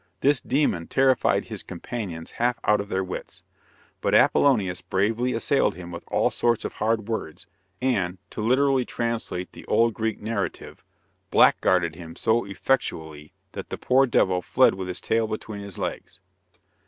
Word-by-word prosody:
This 140 -1 +3
demon 125 - 0
terrified 130 -2 +2
his - - -6
companions 90 -3 -6
half 120 0 0
out 105 -1 +3
of 100 - -9
their 95 -1 0
wits, 95 - -8 0.6
but - - +2
Apollonius 95 -10 +3
bravely 110 +7 0
assailed 115 -3 +1
him 90 -1 -9
with 85 - -7
all - - +1
sorts 120 -2 0
of - - -4
hard 110 0 -1
words, 110 -9 -4 0.4
and, 100 -9 0
to - - -5
literally 130 +3 +3
translate 115 -7 -3
the - - -12
old 115 0 +3
Greek 110 -1 -2
narrative, 105 -2 -4 0.5
"blackguarded" 85 -3 +4
him 85 -1 -10
so 115 0 +1
effectually 80 - -2 0.2
that - - -7
the - - -4
poor 135 +1 +3
devil 95 -6 +2
fled - - +4
with 95 -1 -5
his 90 - -5
tail 115 0 +1
between 110 -1 -5
his 100 -3 -8
legs. - - -5
105 Hz, 155 wpm, -25 LUFS, 90-120 Hz, 0.6 s, blackguarded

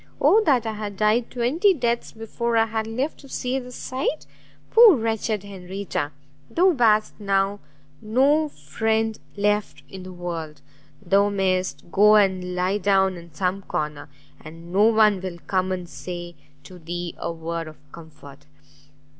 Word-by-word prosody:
Oh 440 - +5
that 255 -6 +3
I 220 - -2
had 210 -2 -6
died 215 +3 +2
twenty 300 - +2
deaths 235 -4 -1
before 230 +1 -2
I 225 - +4
had 220 0 -3
lived 255 +7 -3
to 275 - -15
see 255 +1 -2
this 250 -1 -10
sight! 265 +4 -3 0.5
poor 450 -5 +8
wretched 220 -3 -2
Henrietta, 190 -5 -5 0.4
thou 370 +2 +4
bast 220 -7 +3
now 200 0 0 0.4
no 280 +8 +2
friend 220 - -1 0.2
left 205 0 0
in 190 - -10
the 185 0 -9
world! 165 -4 -6 0.4
thou 200 +3 +3
mayst 185 -3 -1
go 210 +2 +6
and 185 -3 +2
lie 185 +3 0
down 190 -1 +2
in 170 -1 -12
some 185 +4 -2
corner, 150 -4 -4 0.3
and 165 +3 -11
no 205 +3 +5
one 215 -3 +4
will 185 -2 -5
come 185 -1 0
and 180 -2 -4
say 175 +4 -7 0.3
to 185 -2 -13
thee 175 +1 -5
a 170 - -3
word 165 0 -5
of 155 - -11
comfort!" 145 -3 -14
200 Hz, 155 wpm, -23 LUFS, 175-225 Hz, 0.5 s, poor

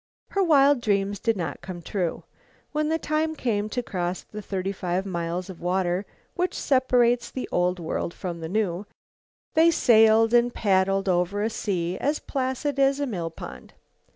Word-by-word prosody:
Her 395 - 0
wild 285 -6 +5
dreams 200 -2 0
did 225 0 0
not 165 -5 -4
come 175 -1 -8
true. 180 -4 -2 0.5
When 300 0 0
the 320 - +2
time 315 0 -1
came 215 -6 -1
to 245 +2 -2
cross 180 -3 -3
the 210 - -8
thirty 195 -1 -3
five 185 0 -2
miles 175 -1 -3
of 190 -3 -10
water 180 +1 0 0.3
which 360 0 -1
separates 245 -3 +2
the 260 - -5
Old 180 +1 +1
World 170 0 -3
from 175 -1 -6
the 160 0 -5
New, 200 -1 -1 0.7
they 325 +1 +6
sailed 225 -6 +5
and 240 0 +4
paddled 195 -2 +1
over 185 +3 +1
a 225 - 0
sea 180 -4 -2
as 295 +2 0
placid 270 +1 -2
as 275 +1 +3
a 285 - 0
mill 180 -10 -3
pond. 165 - -10
205 Hz, 170 wpm, -25 LUFS, 180-255 Hz, 0.7 s, they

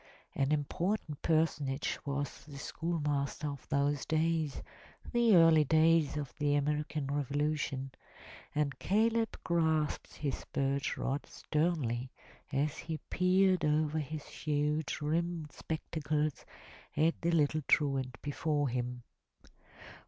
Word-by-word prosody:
An 135 +1 0
important 155 +2 -1
personage 150 -4 +1
was 140 0 -3
the 145 -2 -10
schoolmaster 150 -2 -2
of 140 -1 -8
those 140 0 +1
days 160 -2 0 0.2
— - - -15
the 235 -3 +5
early 165 -2 +7
days 160 0 +4
of 145 -4 -4
the 145 -1 +2
American 150 +1 0
Revolution, 145 -1 -1 0.3
— - - -17
and 145 -2 0
Caleb 225 +2 +1
grasped 160 -3 0
his 140 -3 -3
birch 140 0 0
rod 140 +2 -2
sternly 150 -7 -1 0.4
as 145 +3 0
he 160 -1 -4
peered 185 0 +3
over 150 +1 +2
his 150 0 -5
huge 150 +1 -1
rimmed 165 0 -1
spectacles 155 -1 -2 0.5
at 160 +2 +2
the 170 - +1
little 155 -2 +2
truant 135 -4 +2
before 145 -1 0
him. 125 0 -3
150 Hz, 115 wpm, -32 LUFS, 140-160 Hz, 0.5 s, early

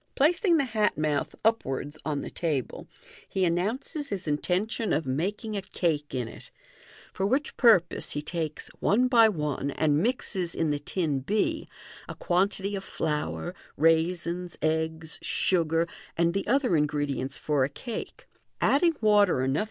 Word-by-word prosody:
Placing 340 +4 +3
the 280 - +2
hat 220 -4 0
mouth 150 -2 -1
upwards 145 - 0
upon 145 -1 -3
the - - -7
table, 150 -7 -3 0.4
he 190 -1 +1
announces 225 - -1
his 185 -6 -4
intention 185 +9 0
of 155 +2 0
making 195 - -2
a 200 - -1
cake 160 -7 -2
in 125 -3 -2
it; - - -12 0.6
for 190 - 0
which 280 +7 0
purpose 215 -9 +4
he 150 - -2
takes, 155 -1 -4
one 245 +5 +3
by 230 -3 +6
one, 150 -6 -2
and 150 +1 +1
mixes 190 -6 -1
in 160 -2 +1
the 145 - -1
tin 150 -2 -1
b, 215 - -1 0.4
a - - -5
quantity 195 +2 0
of 195 - -4
flour, 150 - -3 0.2
raisins, 170 +2 +1
eggs, 160 0 -1
sugar, 165 -2 +2 0.3
and 170 0 +2
the 195 - -2
other 250 -5 +2
ingredients 145 -3 -1
for 145 -3 +1
a 130 - 0
cake, 230 - -7 0.3
adding 330 +3 +3
water 210 -3 +5
enougfc 130 +1 0
Fig. 145 - +1
170 Hz, 150 wpm, -27 LUFS, 150-210 Hz, 0.6 s, by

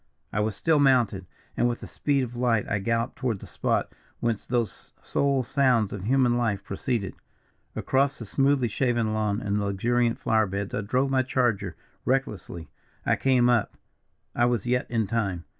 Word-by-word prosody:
"I 105 - 0
was 105 -1 0
still 160 - +2
mounted, 120 -9 +3 0.3
and 120 - +2
with 120 - -4
the - - -6
speed 140 -2 0
of 120 -1 -6
light 120 -3 +1
I 100 - 0
galloped 115 +4 -1
toward 120 -5 -1
the - - -11
spot - - -1 0.3
whence 115 -3 -2
those 120 -3 -2
sole 140 -2 +1
sounds 125 -5 +2
of 100 -2 -6
human 125 0 +3
life 105 -5 0
proceeded. 100 0 -2 0.6
Across 135 +1 +1
the 115 - -7
smoothly 135 +2 +2
shaven 120 -1 0
lawn 105 0 0
and 105 +1 -1
luxuriant 115 +4 +1
flowerbeds 100 -2 0
I - - -1
drove 130 +6 0
my 130 -1 +3
charger 115 - 0 0.3
recklessly. 105 - -2 0.4
I - - +3
came 130 -2 +3
up. 120 -4 +1 0.6
I 120 - +2
was 120 -3 0
yet 125 +1 0
in 115 -2 +1
time! 100 -5 -2
120 Hz, 170 wpm, -26 LUFS, 105-130 Hz, 0.6 s, mounted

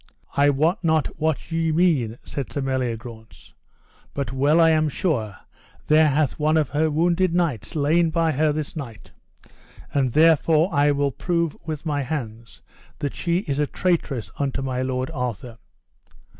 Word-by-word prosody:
I 140 +1 +4
wot 160 +8 +1
not 160 -3 0
what 160 +1 -1
ye 165 0 0
mean, 155 -9 +1
said 140 -3 -6
Sir - - -3
Meliagrance, 120 -4 -5 0.6
but 135 -3 -3
well 145 +5 +3
I 165 -1 +6
am 155 -1 +2
sure 115 - -2 0.5
there 155 +1 +5
hath 145 -1 0
one 155 +1 +2
of 150 -4 +1
her 155 +3 +1
wounded 170 +3 +1
knights 165 - -1
lain 160 +3 +2
by 165 0 +1
her 155 +1 +1
this 150 0 -4
night, 120 -9 -8 0.8
and 135 -4 +1
therefore 160 +2 +4
I 145 +1 +3
will 140 -1 +1
prove 170 +2 -1
with 155 0 -5
my 145 -2 -1
hands 120 -6 -6 0.3
that 145 - -3
she 175 +1 -1
is 140 -7 -3
a 150 - +1
traitress 140 - -1
unto 135 -1 -1
my 130 -1 -2
lord 130 +2 -2
Arthur. 125 - -5
145 Hz, 155 wpm, -23 LUFS, 130-160 Hz, 0.8 s, I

